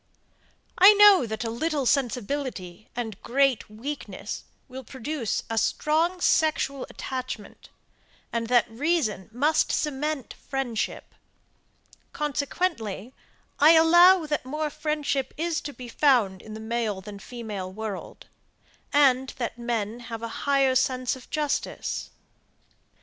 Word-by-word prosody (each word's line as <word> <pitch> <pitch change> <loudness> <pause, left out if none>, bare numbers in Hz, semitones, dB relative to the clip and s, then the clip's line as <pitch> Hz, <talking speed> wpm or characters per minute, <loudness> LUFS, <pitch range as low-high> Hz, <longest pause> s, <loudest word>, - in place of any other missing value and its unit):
I 390 +3 +10
know 405 - +7
that 220 +2 -4
a 225 - -3
little 290 +3 -1
sensibility 245 -7 -2
and 225 -4 -5
great 270 -2 +1
weakness 255 +8 -6 0.2
will 260 +1 -8
produce 265 -1 -3
a 225 0 0
strong 320 - +1
sexual 310 -5 +1
attachment, 255 -5 -6 0.6
and 230 -1 -1
that 245 0 +4
reason 240 - -1
must 295 +7 +2
cement 300 -2 -2
friendship; 265 -5 -4 1.0
consequently 280 - -2 0.5
I 305 +3 +8
allow, 345 +2 +7
that 300 0 -2
more 300 +3 -3
friendship 300 -3 -2
is 335 +1 -1
to 290 - -6
be 250 -3 -10
found 235 -8 +2
in 215 0 -9
the - - -7
male 220 -3 -2
than 205 +1 -9
the 200 - -14
female 210 -6 -6
world, 210 -1 -7 0.7
and 265 -3 +4
that 240 -1 -4
men 235 -1 -2
have 230 -1 -7
a 230 - -3 0.2
higher 275 -2 +4
sense 255 -1 +1
of 260 - -14
justice. 300 -2 -2
260 Hz, 120 wpm, -26 LUFS, 225-300 Hz, 1.0 s, I